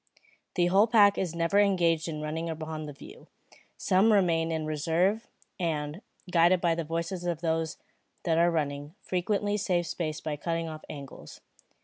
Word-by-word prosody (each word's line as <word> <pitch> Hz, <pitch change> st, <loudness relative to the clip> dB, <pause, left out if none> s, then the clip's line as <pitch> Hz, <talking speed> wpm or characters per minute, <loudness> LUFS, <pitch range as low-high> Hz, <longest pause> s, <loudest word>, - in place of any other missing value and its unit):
The 175 Hz, -, +3 dB
whole 195 Hz, +5 st, +4 dB
pack 205 Hz, -3 st, +5 dB
is 175 Hz, -3 st, -2 dB
never 170 Hz, +4 st, +2 dB
engaged 170 Hz, -5 st, +2 dB
in 155 Hz, -2 st, -4 dB
running 160 Hz, +2 st, -3 dB
upon 155 Hz, -1 st, -5 dB
the -, -, -6 dB
view. 140 Hz, -, -13 dB, 0.5 s
Some 195 Hz, +4 st, +3 dB
remain 165 Hz, -5 st, +2 dB
in 160 Hz, -1 st, -2 dB
reserve, 165 Hz, +8 st, 0 dB, 0.3 s
and, 155 Hz, 0 st, -2 dB, 0.3 s
guided 175 Hz, +1 st, +5 dB
by 170 Hz, -1 st, +2 dB
the 165 Hz, 0 st, -2 dB
voices 170 Hz, +3 st, -3 dB
of 170 Hz, -2 st, -2 dB
those 160 Hz, -1 st, -1 dB, 0.5 s
that 165 Hz, -2 st, +2 dB
are 170 Hz, +1 st, +5 dB
running, 145 Hz, -1 st, -2 dB
frequently 205 Hz, +3 st, 0 dB
save 180 Hz, -4 st, 0 dB
space 155 Hz, -3 st, -3 dB
by 155 Hz, -2 st, -4 dB
cutting 165 Hz, +2 st, -2 dB
off 155 Hz, -1 st, -7 dB
angles. 140 Hz, -2 st, -10 dB
165 Hz, 160 wpm, -28 LUFS, 155-185 Hz, 0.5 s, pack